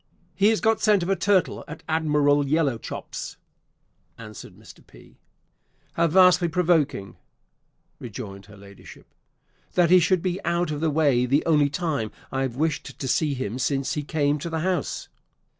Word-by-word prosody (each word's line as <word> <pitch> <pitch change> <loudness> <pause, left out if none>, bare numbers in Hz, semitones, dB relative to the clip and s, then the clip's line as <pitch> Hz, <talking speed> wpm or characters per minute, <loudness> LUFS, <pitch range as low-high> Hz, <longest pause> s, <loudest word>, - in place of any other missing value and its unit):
"He 200 - +2
has 220 0 +2
got 225 0 +2
scent 205 -3 +3
of 175 - -4
a - - +3
turtle 190 0 +1
at 160 - -10
Admiral 150 -2 +2
Yellowchops," 140 -5 -3 0.8
answered 110 -2 -11
Mr. - - -16
P. - - -19 0.7
"How 170 0 +2
vastly 180 +1 +5
provoking," 160 - 0 0.8
rejoined 100 0 -8
her 105 -1 -15
Ladyship, 100 0 -14 0.7
"that 175 -2 +3
he 185 - +8
should 175 +1 +1
be 185 +1 -2
out 170 -1 0
of 150 0 -4
the 160 - +1
way 140 -5 +2
the 140 +4 +1
only 150 -3 +3
time 145 -8 -2 0.2
I 135 - -2
have 130 -3 -2
wished 155 +2 -2
to 135 - -5
see 145 +2 +1
him 125 -1 -4
since 135 +3 -1
he 150 - -2
came 145 0 0
to 170 - -5
the 160 -1 -3
house!" 185 +1 -2
155 Hz, 160 wpm, -24 LUFS, 135-175 Hz, 0.8 s, he